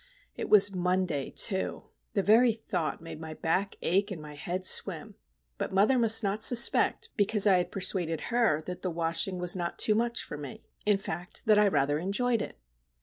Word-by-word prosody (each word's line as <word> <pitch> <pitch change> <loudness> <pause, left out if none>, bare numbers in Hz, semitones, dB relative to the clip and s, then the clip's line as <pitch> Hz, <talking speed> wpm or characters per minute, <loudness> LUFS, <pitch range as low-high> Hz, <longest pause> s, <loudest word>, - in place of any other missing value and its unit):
It - - -6
was 200 -1 +6
Monday, 180 -5 -1
too! 190 -4 -1 0.3
The 200 - +1
very 230 +3 +4
thought 180 -9 -4
made 165 -2 -8
my 160 -1 -8
back 185 +6 -2
ache 195 +4 +1
and 190 -5 -6
my 150 -1 -10
head 175 +6 -5
swim;—but 195 +4 -3
mother 210 +7 +3
must 225 -1 +4
not 205 +2 0
suspect, 245 - +4
because 205 0 +3
I 195 -3 +5
had 180 - -2
persuaded 180 -4 -1
her 220 -11 +1
that 180 +2 -7
the 185 - -3
washing 170 +2 -2
was 180 0 +2
not 175 -1 -4
too 215 - +2
much 235 +2 -1
for 150 - -8
me; 145 -3 -10 0.2
in 205 -1 +4
fact, 175 -2 -7
that 215 -1 +4
I 210 - +4
rather 145 -5 0
enjoyed 220 +6 -1
it! - - -7
190 Hz, 185 wpm, -28 LUFS, 170-210 Hz, 0.3 s, was